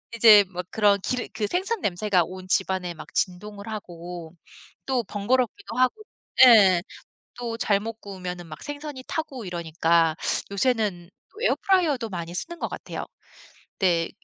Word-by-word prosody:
이제 215 -3 +8
막 180 -1 -5
그런 205 -2 +3
기름 250 +4 -2
그 220 - -1
생선 385 - -1
냄새가 185 -1 +1
온 185 +2 -9
집안에 185 -2 0
막 155 - -11
진동을 200 +3 -3
하고 175 -5 -7 0.5
또 260 -3 0
번거롭기도 240 - -1
하고 255 - +2 0.4
예 200 -7 +7 0.5
또 235 -2 -4
잘못 215 +1 -1
구우면은 180 -3 -6
막 155 - -10
생선이 290 -2 -7
타고 285 -8 -4
이러니까 165 -2 +1 0.4
요새는 200 -5 0 0.3
에어프라이어도 325 - +2
많이 170 -3 -5
쓰는 340 - -5
것 - - -2
같아요. - - -6 0.7
네. 170 -3 +2
205 Hz, 285 characters per minute, -25 LUFS, 180-245 Hz, 0.7 s, 이제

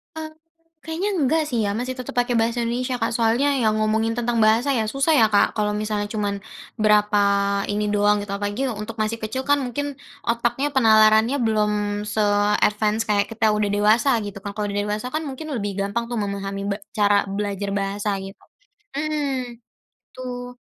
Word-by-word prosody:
Eee, 315 0 -5 0.6
kayaknya 330 +6 -2
enggak 315 +2 +2
sih 240 - -1
ya, 200 - -1
masih 255 +3 -3
tetap 255 - -6
pakai 245 0 +1
bahasa 230 +2 +1
Indonesia 245 +1 -2
Kak, 225 - +1
soalnya 235 +5 +2
yang 220 -4 +2
ngomongin 220 +1 +1
tentang 240 0 -1
bahasa 225 +5 +3
ya 220 - 0
susah 275 +8 +1
ya, 225 - +6
Kak, 205 - +3
kalau 210 -1 +1
misalnya 210 0 -2
cuman 205 -2 -1 0.4
berapa 210 -1 +3 0.5
ini 210 0 -1
doang 205 0 +2
gitu 205 - -8
apalagi 205 +4 -3
untuk 215 0 -5
masih 220 +2 -1
kecil 225 +4 -4
kan 285 - +5
mungkin 285 +3 -4 0.2
otaknya 235 +5 0
penalarannya 220 -1 +5
belum 215 -2 +2 0.3
se-advance 210 +1 +1
kayak 205 -1 +3
kita 220 -1 +2
udah 210 -1 0
dewasa 215 +6 +3
gitu 205 -1 -6
kan 200 +1 -7
kalau 210 -1 -3
udah 200 - -2
dewasa 210 +3 -3
kan 310 +4 -3
mungkin 280 +2 -6
lebih 200 -3 -3
gampang 205 +4 -2
tuh 240 0 -4
memahami 200 -1 -4
be 200 - -1 0.2
cara 205 -1 +3
belajar 200 0 -3
bahasa 200 +1 -2
gitu 195 0 -9 0.6
heeh, 280 -5 -2 0.5
Betul. 250 -1 -7
220 Hz, 170 wpm, -22 LUFS, 205-245 Hz, 0.6 s, ya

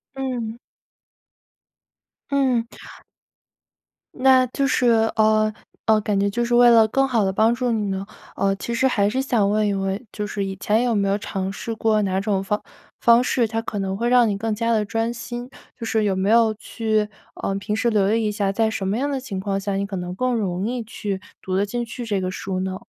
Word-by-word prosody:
嗯。 245 -4 -4 1.7
嗯。 260 -4 +1 1.5
那 260 0 +5
就 275 +3 -1
是 255 -1 +2 0.3
呃， 215 0 +3 0.3
呃， 220 -1 +4
感 205 -1 0
觉 200 0 +2
就 240 +4 -1
是 240 0 +1
为 240 0 +7
了 225 -2 +6
更 270 +5 +1
好 235 -5 +1
地 190 - +1
帮 220 +4 +3
助 245 0 -1
你 220 -2 0
呢， 195 0 -3 0.3
呃， 195 0 +1
其 235 +4 -5
实 260 +3 +2
还 205 -5 +2
是 260 +5 -1
想 230 -7 +1
问 210 0 +2
一 200 - +1
问， 195 +4 -2
就 210 - -4
是 205 -1 -3
以 195 0 -4
前 215 +4 +1
有 240 -2 +1
没 200 -1 +1
有 195 +1 +1
尝 195 -2 -4
试 225 +3 -5
过 220 -1 +2
哪 190 -2 0
种 195 -1 0
方 210 +2 -1 0.4
方 235 +1 +5
式， 245 -2 +1
它 225 +1 -2
可 215 -2 -4
能 190 -1 -2
会 235 +4 -1
让 245 -1 +5
你 200 -2 -1
更 220 +1 -2
加 230 +2 0
地 220 -2 +2
专 225 +2 -1
心？ 240 +1 -7 0.3
就 230 - -4
是 220 -1 +1
有 200 -2 +1
没 190 +2 0
有 225 -1 +5
去 215 -1 -1 0.3
呃， 195 - -1
平 210 +2 -2
时 235 +2 +1
留 205 -2 +2
意 225 -1 0
一 - - 0
下， 205 -1 0
在 220 +2 +1
什 200 -3 -3
么 200 +3 0
样 280 +3 -1
的 275 -2 -1
情 240 -8 -5
况 195 0 -2
下 200 0 -3
你 200 +1 -1
可 200 -1 -6
能 180 0 -5
更 255 +5 0
容 190 -4 -1
易 245 0 -3
去 205 -3 -4 0.2
读 185 - -3
得 195 +2 +2
进 240 +4 -3
去 240 +1 -7
这 205 -4 -1
个 185 0 -2
书 185 0 -4
呢？ 185 0 -3
215 Hz, 240 characters per minute, -22 LUFS, 200-235 Hz, 1.7 s, 为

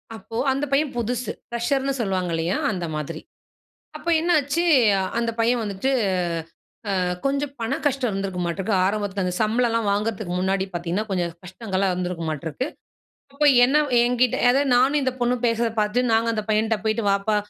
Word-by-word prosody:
அப்போ, 220 +2 -10 0.2
அந்த 275 +2 -1
பையன் 280 +1 +2
புதுசு. 240 +1 -2 0.2
ஃபிரஷர்ன்னு 270 +3 0
சொல்லுவாங்க 185 -5 -1
இல்லையா? 165 +3 0
அந்த 180 -4 -3
மாதிரி. 155 +2 -5 0.8
அப்போ 340 - -3
என்னாச்சு? 325 -1 +1 0.6
அந்த 230 -1 0
பையன் 235 +1 +2
வந்துட்டு 205 +5 -2 1.1
அ - - +1 0.2
கொஞ்சம் 280 +1 -1
பண 230 +4 -1
கஷ்டம் 265 -4 +1
இருந்துருக்குமாட்டுக்கு. 190 +1 -2
ஆரம்பத்துல 205 -1 -1
அந்த 180 0 -2
சம்பளம்லாம் 230 0 +1
வாங்குறதுக்கு 210 -3 -2
முன்னாடி 190 +1 0
பார்த்தீங்கன்னா, 175 +4 -2
கொஞ்சம் 175 -3 -1
கஷ்டங்கள்லாம் 190 0 -2
இருந்துருக்குமாட்டுருக்கு. 170 - -3 0.7
அப்போ 295 +2 +1 0.2
என்ன 270 +4 +2 0.2
என்கிட்ட 245 0 +2
அதாவது 275 +2 +2
நானும் 270 +4 +4
இந்த 260 - +1
பொண்ணும் 245 0 0
பேசுறத 230 0 0
பார்த்து, 210 +4 0
நாங்க 225 +1 +2
அந்த 215 -1 -2
பையன்ட்ட 220 +1 +2
போயிட்டு, 215 +1 0
"வாப்பா" 200 +2 +1
220 Hz, 145 wpm, -23 LUFS, 190-250 Hz, 1.1 s, நானும்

